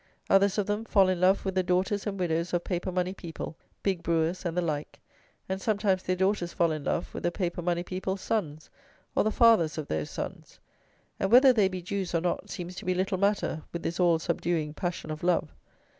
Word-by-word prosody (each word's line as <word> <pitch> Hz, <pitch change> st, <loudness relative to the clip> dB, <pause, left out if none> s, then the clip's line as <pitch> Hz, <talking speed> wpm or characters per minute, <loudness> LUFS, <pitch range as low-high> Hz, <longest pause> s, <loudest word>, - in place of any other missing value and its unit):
Others 195 Hz, +1 st, +4 dB
of 205 Hz, -, +1 dB
them 205 Hz, +2 st, -1 dB
fall 195 Hz, -4 st, +4 dB
in 180 Hz, -1 st, 0 dB
love 190 Hz, +2 st, +4 dB
with 190 Hz, -, -1 dB
the 185 Hz, -, +2 dB
daughters 185 Hz, +3 st, 0 dB
and 200 Hz, -1 st, -3 dB
widows 170 Hz, -1 st, 0 dB
of 175 Hz, -, 0 dB
paper 180 Hz, 0 st, -2 dB
money 180 Hz, +1 st, -1 dB
people, 165 Hz, -3 st, -7 dB, 0.3 s
big 190 Hz, -4 st, 0 dB
brewers, 170 Hz, +3 st, 0 dB
and 170 Hz, 0 st, -2 dB
the -, -, +3 dB
like; 150 Hz, -3 st, -3 dB, 0.5 s
and 190 Hz, +1 st, -3 dB
sometimes 200 Hz, -3 st, +1 dB
their 185 Hz, -, -1 dB
daughters 190 Hz, -2 st, 0 dB
fall 170 Hz, -1 st, +2 dB
in 155 Hz, -2 st, -3 dB
love -, -, -2 dB
with -, -, -5 dB
the 175 Hz, -, +1 dB
paper 175 Hz, -1 st, -2 dB
money 175 Hz, 0 st, 0 dB
people's 190 Hz, +1 st, -3 dB
sons, 155 Hz, -9 st, -3 dB, 0.4 s
or -, -, +3 dB
the 215 Hz, -, +2 dB
fathers 215 Hz, -10 st, +4 dB
of 155 Hz, -, -4 dB
those 75 Hz, -1 st, -2 dB
sons; -, -, -7 dB, 0.6 s
and, 195 Hz, -, 0 dB
whether 255 Hz, +2 st, +8 dB
they 210 Hz, -5 st, +4 dB
be 185 Hz, -2 st, -5 dB
Jews, 185 Hz, -1 st, -3 dB
or 165 Hz, -, +2 dB
not, 175 Hz, 0 st, -2 dB
seems 175 Hz, 0 st, -6 dB
to 210 Hz, -, -7 dB
be 185 Hz, 0 st, +1 dB
little 185 Hz, 0 st, 0 dB
matter 200 Hz, -5 st, +1 dB
with 170 Hz, -, -5 dB
this 170 Hz, -, -3 dB
all 175 Hz, -2 st, +4 dB
subduing 160 Hz, -1 st, -1 dB
passion 175 Hz, -1 st, -4 dB
of 155 Hz, -, -5 dB
love. 175 Hz, -, +1 dB
180 Hz, 220 wpm, -28 LUFS, 170-195 Hz, 0.6 s, whether